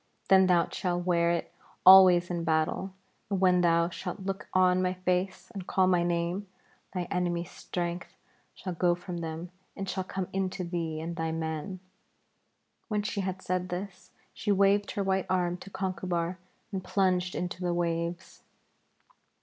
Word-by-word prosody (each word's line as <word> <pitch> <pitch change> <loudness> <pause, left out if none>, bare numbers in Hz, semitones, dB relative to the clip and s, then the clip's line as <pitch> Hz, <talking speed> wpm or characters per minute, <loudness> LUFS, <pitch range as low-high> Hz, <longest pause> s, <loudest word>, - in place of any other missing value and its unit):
Then 190 -1 +7
thou 175 -2 +4
shalt 175 -2 -2
wear 170 -2 +3
it 170 0 -2 0.3
always 185 -2 +8
in 170 -1 -2
battle, 165 +4 0 0.3
and 195 -2 0
when 180 -1 +4
thou 170 -1 +3
shalt 180 +3 -6
look 195 +1 -4
on 185 0 +4
my 185 0 0
face 185 +3 -1
and 195 -4 -7
call 190 - +3
my 180 -1 +3
name, 175 +3 -1 0.4
thy 180 -1 -2
enemies' 175 -1 -1
strength 175 0 -5 0.4
shall 185 - -5
go 175 +1 +2
from 175 0 -7
them 165 +1 -5 0.3
and 195 - -4
shall 190 0 -2
come 185 0 -4
into 190 -1 -2
thee 165 -3 -3
and 170 +1 -4
thy 160 0 -1
men.' 160 +3 -4 1.1
When 210 -1 -1
she 205 -1 -2
had 190 0 -4
said 185 0 -1
this, 180 0 -6 0.2
she 210 - -1
waved 200 +1 +3
her 200 - -1
white 190 -1 0
arm 180 -1 +1
to 190 - -11
Conchubar 185 -2 -2 0.3
and 190 -2 -3
plunged 185 -1 +1
into 180 0 -4
the 175 -1 0
waves. 170 0 -2
180 Hz, 160 wpm, -29 LUFS, 175-190 Hz, 1.1 s, always